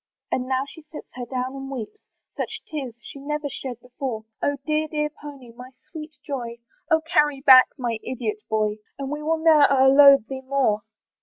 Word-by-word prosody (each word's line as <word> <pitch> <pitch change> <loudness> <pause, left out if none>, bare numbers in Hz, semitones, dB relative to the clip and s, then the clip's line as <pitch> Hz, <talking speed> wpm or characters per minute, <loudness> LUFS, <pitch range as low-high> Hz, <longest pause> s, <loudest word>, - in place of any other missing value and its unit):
And 255 0 -1
now 260 0 0
she 320 - -13
sits 300 0 -12
her 245 -1 -7
down 255 +1 -3
and 270 0 -7
weeps; 265 - -7 0.4
Such - - -5
tears 270 -7 -6
she 280 - -10
never 300 +1 -3
shed 260 -3 -6
before; 250 -3 -5 0.2
"Oh 285 0 0
dear, 310 0 0
dear 300 -1 -2
pony! 280 -5 -10
my 250 +2 -12 0.2
sweet 310 -2 -9
joy! 240 -5 -5 0.3
"Oh 320 -1 +3
carry 295 -3 +1
back 260 -1 +8
my 235 -4 -2
idiot 235 -5 -3
boy! 215 -1 0 0.2
"And 275 0 -5
we 300 0 -4
will 320 +2 0
ne'er 315 -3 +5
o'erload 275 -2 +7
thee 265 0 -6
more." 260 -6 0
270 Hz, 180 wpm, -23 LUFS, 250-300 Hz, 0.4 s, back